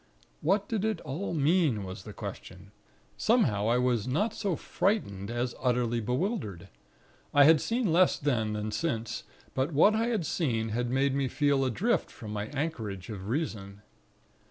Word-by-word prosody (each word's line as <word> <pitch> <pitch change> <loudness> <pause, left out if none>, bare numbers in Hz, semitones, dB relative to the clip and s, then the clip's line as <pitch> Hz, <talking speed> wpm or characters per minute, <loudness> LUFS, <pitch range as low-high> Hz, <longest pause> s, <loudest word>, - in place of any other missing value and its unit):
What 195 +5 +2
did 220 -3 -1
it 220 0 0
all 155 +7 -4
mean? 150 - +2
was 95 0 -8
the 105 - -7
question; 100 -2 -8 0.5
somehow 125 - +2
I 120 +2 +3
was 125 -3 +1
not 205 - 0
so 200 -6 -1
frightened, 105 - -1
as 120 +1 -2
utterly 120 -2 +1
bewildered. 120 - -2 0.7
I 145 - +8
had 155 +1 +6
seen 230 -7 0
less 180 +1 +4
then, 115 -7 0
than 105 0 -3
since; 115 -5 -2 0.3
but 135 +5 -1
what 180 +9 +6
I 225 +2 +1
had 220 -8 0
seen, 115 -10 0
had 120 +2 -1
made 135 +2 +2
me 140 -1 +1
feel 140 0 +2
adrift 195 - 0
from 105 -2 -8
my 105 0 -3
anchorage 120 - -4
of 100 -1 -6
Reason. 105 -8 -3
130 Hz, 160 wpm, -29 LUFS, 110-165 Hz, 0.7 s, I